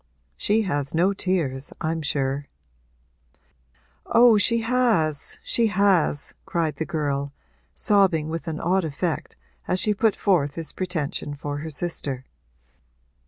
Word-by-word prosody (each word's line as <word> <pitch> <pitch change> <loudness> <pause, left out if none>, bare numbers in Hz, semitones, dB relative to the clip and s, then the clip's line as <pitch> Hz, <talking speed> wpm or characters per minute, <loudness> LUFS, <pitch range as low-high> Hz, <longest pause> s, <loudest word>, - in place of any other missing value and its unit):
She 210 - +1
has 145 -6 -2
no 180 +4 +3
tears, 160 -9 -1
I'm 160 0 -1
sure.' 140 -1 -1 1.6
'Oh, 235 -2 +6
she 230 +3 +3
has, 225 - +1
she 230 -1 +2
has!' 190 -7 +2
cried 170 -5 -1
the 160 - -3
girl, 140 -3 -2 0.4
sobbing 190 -7 +3
with 165 +1 -5
an 160 -1 -3
odd 185 +2 +1
effect 160 +2 -3 0.3
as 185 - +1
she 210 - +2
put 215 +1 +2
forth 155 -8 +1
this 165 -2 -5
pretension 155 -5 -3
for 145 0 -4
her 160 +2 -5
sister. 145 -5 -4
165 Hz, 125 wpm, -24 LUFS, 145-195 Hz, 1.6 s, Oh